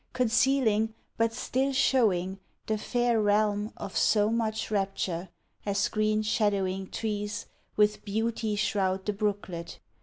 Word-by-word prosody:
Concealing, 240 -3 +2 0.2
but 230 0 +2
still 265 +4 -1
showing, 200 -9 +2 0.3
the 215 -1 -1
fair 240 -1 +1
realm 210 0 +2
Of 190 - -7
so 210 0 +3
much 220 -1 -1
rapture, 195 -3 -1 0.3
as 200 -1 +1
green 215 0 +1
shadowing 195 -3 0
trees 210 -1 -3 0.3
With 210 0 +2
beauty 220 +1 -1
shroud 195 -2 0
the 210 - 0
brooklet. 200 -5 -3
210 Hz, 120 wpm, -28 LUFS, 200-225 Hz, 0.3 s, so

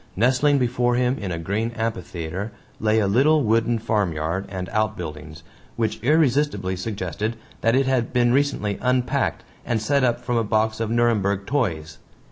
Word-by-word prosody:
Nestling 130 +6 +3
before 120 -1 +1
him 125 +2 +1
in 100 -3 -4
a 85 - -2
green 100 +7 -2
amphitheater 95 -2 -4 0.3
lay 110 0 +2
a 110 - +3
little 140 +9 +3
wooden 115 +1 +2
farm 105 -5 0
yard 80 +5 -2
and 95 -2 -5
outbuildings, 80 -8 -3 0.3
which 115 -2 -2
irresistibly 135 - +2
suggested 100 +2 -3 0.3
that 115 +2 +3
it 135 +1 +3
had 130 -3 0
been 120 -1 +3
recently 130 -8 0
unpacked 125 -1 0 0.2
and 115 -2 0
set 140 +5 +1
up 120 -1 +2
from 120 0 -2
a 115 - +2
box 110 +1 0
of 115 -1 -1
Nuremberg 105 -4 +1
toys. 85 - -2
110 Hz, 160 wpm, -23 LUFS, 100-125 Hz, 0.3 s, Nestling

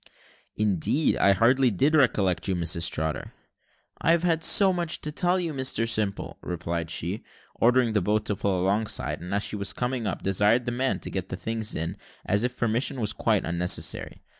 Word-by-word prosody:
"Indeed, 105 - +1
I 100 - +5
hardly 125 +6 +4
did 135 - +1
recollect 105 - +2
you, 95 - +1
Mrs 85 0 0
Trotter." 80 0 -4 0.7
"I've 165 0 +2
so 195 +1 +5
much 170 -2 -2
to 150 - -3
tell 180 +4 +1
you, 170 -3 -2
Mr 130 -4 0
Simple," 110 -3 -2
replied 85 -1 -4
she, 90 +6 -2 0.3
ordering 120 -1 +3
the 105 - +2
boat 105 +3 0
to 105 - -1
pull 95 -2 -1
alongside; 100 +2 -1
and 90 +2 -7
as 100 +1 +1
she - - -1
was 100 -1 -1
coming 125 -2 -2
up, - - -4
desired 105 +5 +2
the 120 - -1
man 130 +2 -1
to - - -6
get 95 -3 -4
the 90 - -5
things 110 +2 -3
in, 80 +5 -3 0.3
as 100 +2 +1
if 125 0 -2
permission 120 +3 -1
was 110 -2 -1
quite 110 -3 +1
unnecessary. 85 +2 -1
110 Hz, 185 wpm, -26 LUFS, 95-130 Hz, 0.7 s, I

